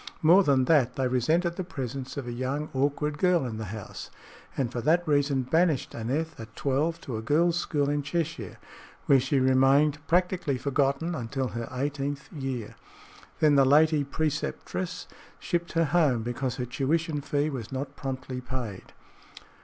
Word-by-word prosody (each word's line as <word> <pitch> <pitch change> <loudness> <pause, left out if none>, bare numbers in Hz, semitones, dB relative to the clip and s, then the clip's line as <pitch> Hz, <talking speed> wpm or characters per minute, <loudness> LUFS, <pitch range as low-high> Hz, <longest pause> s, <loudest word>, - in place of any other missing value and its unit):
More 175 +5 +7
than 135 -5 +3
that, 130 -5 +3
they 130 -1 +1
resented 160 +8 +1
the 185 - -2
presence 135 -4 -5
of 140 - -3
a 120 - -4
young, 130 +5 -3
awkward 145 +2 0
girl 180 -6 +3
in 115 -3 -4
the 110 - -4
house, 105 +1 -7 0.5
and 130 -4 0
for 120 - -3
that 170 +6 +2
reason 140 -2 +2
banished 160 +2 +1
Aneth 145 +8 -3
at 110 0 -10
twelve 145 +5 0
to 120 -5 -5
a - - -4
girl's 165 +8 +2
school 145 -4 0
in 145 0 0
Cheshire, 155 - -3 0.5
where 135 - +6
she 135 +3 -1
had 130 - +3
remained, 135 +3 +4
practically 175 -5 +1
forgotten, 140 +5 0
until 130 -1 -3
her 115 +2 -5
eighteenth 140 +1 -3
year. 135 -7 -4 0.7
Then 150 -1 +5
the 140 -1 +6
lady 150 +2 +4
preceptress 160 +5 -3 0.3
shipped 170 0 -2
her 165 0 +3
home 145 -7 +2
because 120 +1 -2
her 125 -1 -3
tuition 150 +5 -1
fee 145 +2 0
was 120 -6 -6
not 135 +2 -4
promptly 130 -1 -5
paid. 125 -6 -6
140 Hz, 165 wpm, -27 LUFS, 130-155 Hz, 0.7 s, More